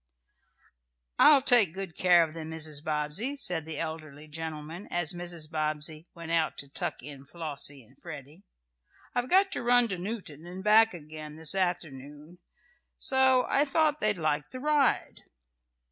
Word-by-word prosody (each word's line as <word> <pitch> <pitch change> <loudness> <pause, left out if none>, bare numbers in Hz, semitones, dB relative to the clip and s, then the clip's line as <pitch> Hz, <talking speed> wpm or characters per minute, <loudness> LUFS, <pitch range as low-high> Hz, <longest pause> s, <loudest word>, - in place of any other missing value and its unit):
"I'll 285 -3 +7
take 230 - +4
good 190 -4 -5
care 175 -2 +5
of 160 -1 -5
them, 160 -1 -6
Mrs. 155 -2 -4
Bobbsey," 155 - -1
said 175 - -3
the 160 -2 -6
elderly 155 -2 -6
gentleman, 160 +3 -6
as 175 -2 0
Mrs. 175 -3 -5
Bobbsey 155 +1 -3
went 165 -1 -7
out 165 -2 +1
to 140 - -2
tuck 135 - -3
in 140 -1 -9
Flossie 145 -3 -6
and 120 +5 -21
Freddie 155 0 -10 0.7
"I've 245 +1 -1
got 385 +1 +4
to - - -2
run 245 +1 +4
into 195 -6 -3
Newton 175 -6 -6
and 185 +2 -8
back 220 0 +5
again 155 -1 -9
this 160 +1 +1
afternoon, 160 -3 -4 0.6
so 265 -1 +4
I 280 - +4
thought 300 +1 +1
they'd 210 -2 +2
like 150 -2 -1
the 255 - -7
ride." 295 -1 +1
165 Hz, 155 wpm, -29 LUFS, 150-210 Hz, 0.7 s, I'll